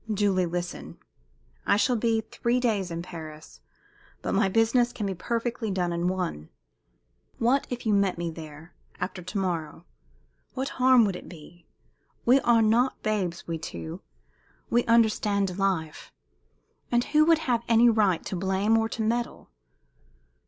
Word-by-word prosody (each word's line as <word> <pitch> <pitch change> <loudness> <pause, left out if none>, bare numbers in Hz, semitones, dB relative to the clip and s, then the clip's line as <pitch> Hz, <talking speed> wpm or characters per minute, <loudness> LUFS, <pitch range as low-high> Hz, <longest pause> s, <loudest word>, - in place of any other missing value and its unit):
"Julie, 195 -3 +1
listen! 175 +1 -5 0.7
I - - +4
shall 245 +3 +2
be 225 0 +1
three 235 +2 -1
days 210 -7 0
in 170 0 -5
Paris, 155 -3 -10 0.6
but - - -2
my 195 - +2
business 230 +4 +2
can 220 -4 -4
be 195 - -1
perfectly 230 +4 -3
done 180 -3 -1
in 170 +1 -1
one. 180 - -3 0.9
What 255 +4 +2
if 245 -1 -5
you 215 - +2
met 200 -3 +2
me 170 -1 -3
there 160 0 -11 0.3
after 185 0 -4
to 185 +4 -6
morrow? 170 -6 -3 0.7
What 265 +1 -2
harm 255 -2 +5
would 195 -3 -1
it - - -9
be? 175 +1 -14 0.6
We 255 +3 +6
are 235 -3 +3
not 235 +4 +2
babes, 185 -5 -2
we 165 -1 -3
two. 85 - -7 0.7
We 240 +1 +3
understand 210 -4 +2
life. 175 -6 -2 0.8
And 240 0 +3
who 305 +3 +3
would 330 0 +5
have 240 -3 +1
any 230 +1 +6
right 210 -7 +2
to - - -4
blame 195 +4 +1
or 225 0 -1
to 225 - -3
meddle? 235 - -2
200 Hz, 150 wpm, -26 LUFS, 175-235 Hz, 0.9 s, We